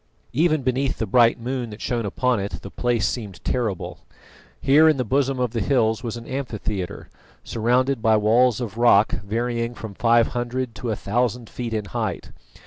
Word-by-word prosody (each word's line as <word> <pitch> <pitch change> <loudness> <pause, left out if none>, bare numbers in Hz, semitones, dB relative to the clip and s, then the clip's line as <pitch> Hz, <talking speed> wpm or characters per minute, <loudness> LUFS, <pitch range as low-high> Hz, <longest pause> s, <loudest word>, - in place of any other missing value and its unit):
Even 155 +1 +2
beneath 130 +1 0
the 110 - -1
bright 115 +3 +4
moon 125 0 -3
that 105 0 -10
shone 115 -3 -2
upon 125 +3 0
it 100 +1 -5
the 100 - -8
place 120 -6 0
seemed 105 -7 -5
terrible. 110 -7 -2 0.6
Here 150 +4 +5
in 155 - +2
the 125 - 0
bosom 135 +2 +1
of 125 -3 0
the 115 -2 -2
hills 110 -2 +1
was 120 -2 -4
an 115 - -9
amphitheatre, 110 -8 -4 0.4
surrounded 125 +3 +1
by 110 -1 +4
walls 115 +3 +3
of 115 -2 -5
rock 110 -3 +5
varying 115 +3 -2
from 110 -3 -8
five 115 +2 +3
hundred 120 0 -3
to 120 +1 -5
a 110 - 0
thousand 120 +3 -1
feet 120 -2 -5
in 105 -1 -2
height. 95 - -4
120 Hz, 180 wpm, -23 LUFS, 110-125 Hz, 0.6 s, Here